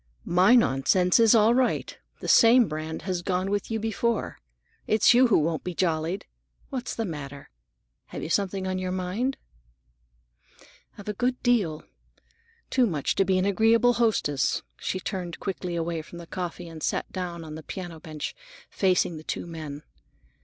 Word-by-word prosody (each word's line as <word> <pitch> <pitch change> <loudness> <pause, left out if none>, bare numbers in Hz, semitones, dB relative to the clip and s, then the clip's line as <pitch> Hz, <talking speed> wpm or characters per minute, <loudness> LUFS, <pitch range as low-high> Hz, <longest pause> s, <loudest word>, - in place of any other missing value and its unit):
"My 185 +7 +5
nonsense 180 - +3
is 230 0 +6
all 220 +1 +5
right. 255 0 0 0.3
The - - -5
same 235 0 +6
brand 155 +1 -5
has 185 -2 -2
gone 185 +2 -1
with 205 -1 -1
you 225 -1 -1
before. 225 +1 -1 0.5
It's 215 +2 +5
you 250 +1 +6
who 230 - +4
won't 160 +1 0
be 180 -1 -5
jollied. 170 +2 -1 0.5
What's 255 -2 -4
the 225 - -2
matter? 145 -5 -7 0.6
You - - -6
have 160 - -2
something 195 -1 0
on 185 0 -2
your 185 0 -3
mind." 190 +9 -2 1.6
"I've 205 - -11
a 210 - -1
good 250 +4 -1
deal. 205 -11 +1 0.9
Too 255 -2 +3
much 155 -8 -1
to 195 - +2
be 190 0 +2
an 185 - +1
agreeable 225 +4 +4
hostess." 215 - +1 0.2
She 185 - -2
turned 180 -3 -5
quickly 180 -3 -4
away 165 -1 -2
from 165 +2 -12
the 170 - -9
coffee 175 0 -5
and 165 -1 -10
sat - - -2
down 175 -3 -5
on 155 -1 -8
the 160 - -7
piano 175 0 -7
bench, 155 -1 -6 0.4
facing 180 -3 +1
the 155 - -10
two - - -4
men. 155 -3 -7
185 Hz, 165 wpm, -26 LUFS, 165-220 Hz, 1.6 s, is